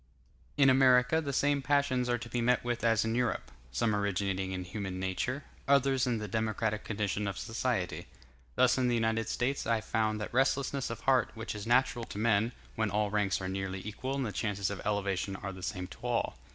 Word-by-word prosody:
In 140 -2 +6
America 130 +2 +5
the 140 -3 -3
same 145 +1 +2
passions 130 -3 +1
are 120 - +2
to 120 - -8
be 120 0 -2
met 125 +1 +2
with 120 -2 -2
as 115 -1 +3
in 115 - 0
Europe; 120 -3 -1 0.2
some 105 - +1
originating 95 -2 -1
in 90 -1 -3
human 95 0 -5
nature, 95 +9 -2 0.2
others 135 -2 +3
in 120 -2 +1
the 105 -1 -4
democratic 110 -1 -1
condition 105 -1 -2
of 100 - -3
society. 115 -5 -2 0.5
Thus 130 +1 +4
in 125 - +2
the 120 - +2
United 115 -1 0
States 135 +3 -1
I 115 -1 +2
found 110 0 0
that 105 - -5
restlessness 135 +1 +1
of 115 -1 -6
heart 130 -3 +3
which 110 +1 -5
is 105 0 -6
natural 120 -1 +2
to 100 - -8
men, 110 +1 +2 0.2
when 110 -1 0
all 105 +1 0
ranks 105 -2 +1
are 95 - -3
nearly 95 0 -4
equal 130 +5 -3
and 135 -2 -1
the 105 - -3
chances 100 0 -1
of 100 - -5
elevation 100 -2 -1
are 95 0 -5
the 95 - -10
same 90 0 -3
to - - -11
all. 120 -1 -1
115 Hz, 205 wpm, -31 LUFS, 100-125 Hz, 0.5 s, In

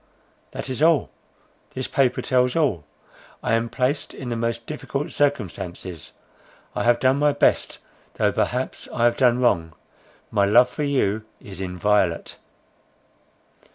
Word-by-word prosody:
"That - - -6
is 130 +2 -4
all—this 155 -4 -2
paper 130 -3 +1
tells 125 -1 +2
all. 130 - +1 0.6
I - - 0
am 115 +1 +1
placed 130 +5 -1
in 130 - -6
the 120 - -2
most 115 0 -2
difficult 140 -1 -4
circumstances. 95 - -3 0.6
I - - -1
have 120 0 +4
done 130 +1 +3
my 145 0 +3
best, - - +1 0.4
though - - +2
perhaps - - -2
I - - -1
have 120 0 +4
done 125 -2 +3
wrong. 85 -10 +1 0.6
My 100 - +3
love 120 +5 +5
for 140 - -6
you 110 -7 0
is 95 -2 -10
inviolate." 90 -1 0
120 Hz, 135 wpm, -23 LUFS, 100-135 Hz, 0.6 s, love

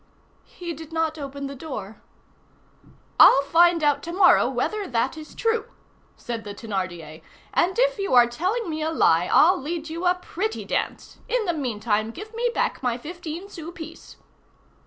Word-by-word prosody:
"He 345 -2 -7
did 320 +1 -11
not 320 -1 -1
open 280 0 -6
the 275 - -5
door." 220 -8 -7 1.2
"I'll 275 - +8
find 335 +2 +4
out 290 -1 +3
to 340 - -6
morrow 375 +3 +5
whether 425 -2 -2
that 245 +3 0
is 310 -1 -11
true," 455 -1 0 0.5
said 235 -2 -5
the 205 -1 -7
Thénardier; 180 -8 -5 0.3
"and 365 +5 +1
if - - +2
you 390 -10 0
are 245 -1 +8
telling 365 - -2
me 315 -1 -3
a 315 - 0
lie, 175 - +3
I'll 360 +2 +5
lead 320 +2 -4
you 340 +2 -2
a 355 - +4
pretty 380 +4 -4
dance. - - -3
In 470 -1 +1
the 345 - 0
meantime, 220 -6 -1
give 420 - -9
me 475 +2 0
back - - -1
my 245 -2 0
fifteen 340 +5 -7
sou 335 -4 -8
piece." 330 -2 -11
320 Hz, 170 wpm, -24 LUFS, 245-360 Hz, 1.2 s, I'll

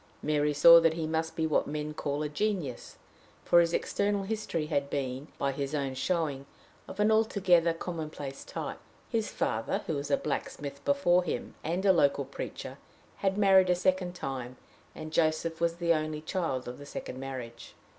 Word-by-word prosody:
Mary 150 -1 +2
saw 170 +3 +9
that 165 -1 +3
he 165 -1 -2
must 160 +1 -2
be 160 - 0
what 155 - +1
men 150 +1 -4
call 145 0 -2
a - - -1
genius, 155 - -3 0.5
for 175 - +6
his 170 -1 +3
external 200 +3 0
history 200 -6 -2
had 140 -3 -1
been, 135 0 -3
by 140 - 0
his 140 +2 -3
own 140 -2 -1
showing, 140 -1 -1 0.4
of 195 - -9
an 210 +1 +4
altogether 190 -6 +3
commonplace 155 -5 -6
type. - - -5 0.3
His 225 -3 0
father, 115 -1 -1
who - - -2
was 145 -1 -3
a - - +3
blacksmith 145 - -4
before 280 -11 +3
him, 175 - -4
and 175 +5 -1
a 190 - +7
local 140 -4 +2
preacher, - - -7 0.4
had 195 0 0
married 190 -2 +5
a 180 - +4
second 180 0 0
time, 130 -5 -5 0.4
and 155 0 -8
Joseph 160 +1 +1
was 170 0 +1
the 170 -1 +2
only 155 -1 -2
child 155 -7 -2
of 125 +2 -7
the 145 - -10
second 130 - -6
marriage. 130 -3 -7
160 Hz, 175 wpm, -29 LUFS, 140-180 Hz, 0.5 s, saw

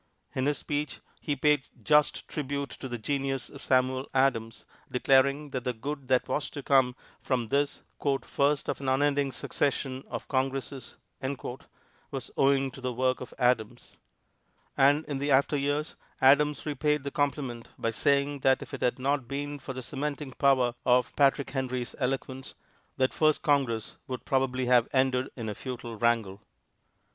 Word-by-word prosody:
In 130 +1 0
his 145 - +1
speech 150 0 -3 0.2
he 145 - -2
paid 145 0 +2 0.2
just 150 -1 +3
tribute 140 -3 -3
to 130 - -6
the 120 - -3
genius 135 +2 -2
of - - -12
Samuel 130 +1 +1
Adams, 115 -4 +1 0.2
declaring 140 +3 +3
that 130 -3 -4
the 125 - -1
good 140 +4 -5
that 130 -1 +2
was 135 +2 -1
to 145 - -7
come 130 -3 +3 0.3
from 120 -4 -1
this 140 +2 0 0.4
"first 140 0 +1
of - - -2
an 135 - -1
unending 140 +1 +2
succession 135 0 -2
of - - -6
Congresses" 135 -1 -2 1.1
was - - -6
owing 135 -1 +3
to 135 - -11
the 130 0 -2
work 130 +1 0
of 125 - -7
Adams. 125 -2 0 0.8
And 145 +3 +4
in 140 -2 -4
after 140 +2 +4
years 145 +2 -1 0.2
Adams 145 +2 +4
repaid 150 0 0
the 140 - -4
compliment 135 -5 -2
by 115 - -1
saying 140 +4 +1
that 130 0 +3
if - - -14
it - - -5
had 125 - +1
not 135 -1 0
been 145 +2 -4
for 135 0 -6
the 130 0 -6
cementing 145 +1 -4
power 130 -2 +3
of 125 -1 +3
Patrick 140 0 +3
Henry's 130 -2 -2
eloquence, 135 0 -3 0.4
that 130 0 +2
first 155 -1 +2
Congress 135 -8 +1 0.3
probably 130 -1 +1
would 125 - -1
have 120 -2 +5
ended 130 -1 +2
in 115 -3 -5
a 105 - -2
futile 120 0 -6
wrangle. 110 -4 0
135 Hz, 160 wpm, -28 LUFS, 125-145 Hz, 1.1 s, have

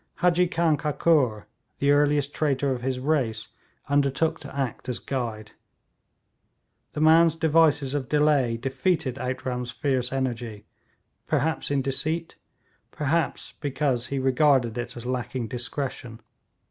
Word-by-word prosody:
Hadji 180 0 +3
Khan 165 -3 +1
Kakur, 145 -7 +1 0.3
the 140 +1 +2
earliest 145 -1 +2
traitor 140 -2 0
of 125 -2 -2
his 130 0 -1
race, 125 -5 0 0.4
undertook 145 +3 +1
to 140 -1 -10
act 130 -1 -3
as 125 - -1
guide. 115 -5 -4 1.4
This 150 - -1
man's 165 0 +6
devices 160 -4 +3
of 140 -4 -3
delay 145 -6 +2
defeated 135 +2 -1
Outram's 125 -1 -3
fiery 135 -1 0
energy, 120 -5 -3 0.6
perhaps 160 +1 0
in 140 -1 +1
deceit, 155 +5 -2 0.5
perhaps 160 +3 -1
because 135 -4 0
he 140 - -3
regarded 130 -2 +3
it 120 0 -4
as 120 - -7
lacking 125 -1 -3
discretion. 125 -2 -4
135 Hz, 120 wpm, -25 LUFS, 125-150 Hz, 1.4 s, man's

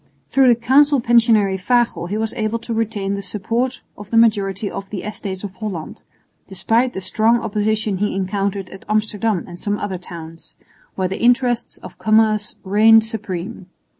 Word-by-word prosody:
Through 270 -1 +4
the 235 -2 +4
Council 280 +4 +4
Pensionary 225 -5 +3
Fagel 235 -3 +1
he 205 - -2
was 220 0 -1
able 220 +1 -1
to 230 0 -6
retain 215 -3 -2
the 200 - -3
support 230 +6 -2
of 205 0 -11
the 230 - +1
majority 205 -3 +2
in 195 - -5
the 195 -2 -5
Estates 200 -2 -5
of 200 -2 -6
Holland, 185 -4 -6 0.5
despite 230 +6 0
the 190 - -5
strong 220 +5 +2
opposition 215 -1 -1
he 205 -1 -1
encountered 195 0 -2
at 190 - -11
Amsterdam 215 -2 0
and 175 -1 -10
some 205 0 -2
other 195 -3 -4
towns, 165 -2 -11 0.4
where 185 -1 0
the 190 - -5
interests 245 0 +1
of - - -12
commerce 215 -1 +2
reigned 220 +3 +5
supreme. 195 -3 -6
210 Hz, 165 wpm, -20 LUFS, 195-230 Hz, 0.5 s, reigned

